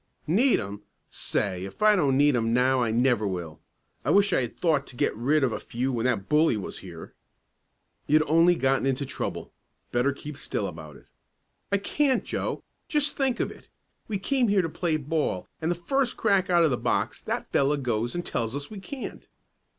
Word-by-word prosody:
"Need 230 Hz, -, +3 dB
'em? 100 Hz, +1 st, -6 dB, 0.3 s
Say 95 Hz, -2 st, -2 dB
if 100 Hz, -, -6 dB
I 215 Hz, 0 st, +6 dB
don't 140 Hz, -8 st, +2 dB
need 145 Hz, -1 st, +4 dB
'em 115 Hz, -1 st, +1 dB
now 130 Hz, +1 st, +3 dB
I 115 Hz, -, +1 dB
never 120 Hz, -2 st, +2 dB
will. 85 Hz, -4 st, -5 dB, 0.4 s
I -, -, -1 dB
wish 200 Hz, -1 st, +4 dB
I -, -, +3 dB
had 120 Hz, -2 st, -5 dB
thought 155 Hz, -5 st, +1 dB
to 125 Hz, -, -12 dB
get -, -, 0 dB
rid 140 Hz, +7 st, +2 dB
of 130 Hz, -, +2 dB
a -, -, -3 dB
few 130 Hz, +3 st, -3 dB
when 120 Hz, +1 st, 0 dB
that 110 Hz, -6 st, -1 dB
bully 150 Hz, -5 st, +3 dB
was 100 Hz, -, -5 dB
here." 85 Hz, -3 st, -10 dB, 0.9 s
"You'd 155 Hz, +1 st, +4 dB
only 165 Hz, +3 st, +4 dB
gotten 135 Hz, -2 st, +1 dB
into 135 Hz, +1 st, 0 dB
trouble. 135 Hz, -, -5 dB, 0.4 s
Better 125 Hz, +3 st, +2 dB
keep 145 Hz, +1 st, -8 dB
still 105 Hz, -, -3 dB
about 80 Hz, -5 st, -8 dB
it." -, -, -17 dB, 0.7 s
"I 200 Hz, -, +4 dB
can't 265 Hz, +6 st, +1 dB
Joe. -, -, -3 dB, 0.2 s
Just 295 Hz, -2 st, +1 dB
think 265 Hz, -3 st, 0 dB
of -, -, -1 dB
it! -, -, -15 dB, 0.4 s
We 210 Hz, -, -2 dB
came 255 Hz, +5 st, +1 dB
here 200 Hz, -2 st, +3 dB
to 165 Hz, -, -2 dB
play 160 Hz, 0 st, -1 dB
ball, 150 Hz, -, -2 dB
and 160 Hz, -, 0 dB
the 175 Hz, -, +1 dB
first 255 Hz, +9 st, -1 dB
crack 200 Hz, -4 st, +2 dB
out 175 Hz, -1 st, +5 dB
of 160 Hz, -, +3 dB
the 125 Hz, -, +1 dB
box -, -, -1 dB
that -, -, -4 dB
fellow 140 Hz, +2 st, +2 dB
goes 120 Hz, -2 st, -1 dB
and 175 Hz, -, -3 dB
tells 115 Hz, +2 st, -2 dB
us 140 Hz, +5 st, -5 dB
we 210 Hz, -, -7 dB
can't." 260 Hz, +7 st, -7 dB
140 Hz, 205 wpm, -26 LUFS, 120-180 Hz, 0.9 s, I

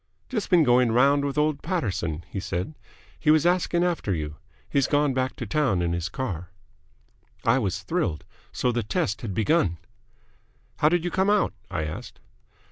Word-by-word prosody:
"Just 220 Hz, -6 st, -2 dB
been 175 Hz, -4 st, +6 dB
going 125 Hz, -2 st, +4 dB
round 140 Hz, +4 st, +4 dB
with 140 Hz, 0 st, -2 dB
old 150 Hz, -1 st, +1 dB
Paterson," 90 Hz, -, -2 dB
he 100 Hz, -, -5 dB
said. 95 Hz, -, -3 dB, 0.5 s
"He 150 Hz, -, 0 dB
was 155 Hz, +1 st, +5 dB
asking 175 Hz, -1 st, +2 dB
after 170 Hz, -, 0 dB
you. 75 Hz, -1 st, -5 dB, 0.3 s
He's 140 Hz, -2 st, +1 dB
gone 145 Hz, -2 st, +2 dB
back 130 Hz, 0 st, -1 dB
to 120 Hz, -, -5 dB
town 110 Hz, -7 st, +1 dB
in 85 Hz, 0 st, 0 dB
his 85 Hz, 0 st, -2 dB
car." 90 Hz, -7 st, -4 dB, 1.0 s
I 115 Hz, +3 st, +4 dB
was 100 Hz, -4 st, -2 dB
thrilled. 150 Hz, -, -1 dB, 0.3 s
So 125 Hz, -, 0 dB
the 120 Hz, 0 st, 0 dB
test 105 Hz, -1 st, -1 dB
had 100 Hz, -6 st, -4 dB
begun! 110 Hz, -, +2 dB, 1.0 s
"How 150 Hz, -, +4 dB
did 175 Hz, 0 st, +1 dB
you 175 Hz, -, -1 dB
come 190 Hz, +1 st, +2 dB
out?" 210 Hz, -1 st, +2 dB, 0.2 s
I 90 Hz, -5 st, -2 dB
asked. 75 Hz, 0 st, -7 dB
125 Hz, 175 wpm, -25 LUFS, 95-155 Hz, 1.0 s, been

